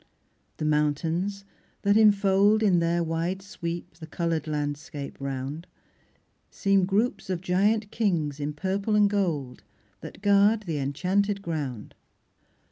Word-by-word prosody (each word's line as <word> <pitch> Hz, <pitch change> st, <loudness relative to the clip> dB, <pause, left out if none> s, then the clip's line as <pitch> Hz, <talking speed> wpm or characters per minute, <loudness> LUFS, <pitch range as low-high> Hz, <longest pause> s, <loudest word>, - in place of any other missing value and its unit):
The 155 Hz, -, -3 dB
mountains 160 Hz, +6 st, 0 dB, 0.4 s
that 200 Hz, 0 st, +3 dB
infold, 205 Hz, 0 st, +4 dB
In 185 Hz, -5 st, +4 dB
their 170 Hz, +1 st, +1 dB
wide 165 Hz, +4 st, -2 dB
sweep, 170 Hz, -4 st, -6 dB
the 160 Hz, -2 st, -10 dB
coloured 165 Hz, -1 st, -2 dB
landscape 145 Hz, -1 st, -4 dB
round, 140 Hz, +4 st, -4 dB, 0.8 s
Seem 195 Hz, -2 st, +2 dB
groups 205 Hz, +3 st, 0 dB
of 185 Hz, -2 st, -1 dB
giant 205 Hz, +4 st, +1 dB
kings, 165 Hz, -10 st, 0 dB
in 145 Hz, +1 st, -3 dB
purple 195 Hz, +6 st, -1 dB
and 210 Hz, -1 st, +5 dB
gold, 160 Hz, -, -2 dB, 0.4 s
That -, -, -11 dB
guard 205 Hz, +2 st, +4 dB
the 165 Hz, -6 st, -3 dB
enchanted 190 Hz, +9 st, 0 dB
ground. 145 Hz, -, -4 dB
175 Hz, 125 wpm, -26 LUFS, 150-200 Hz, 0.8 s, and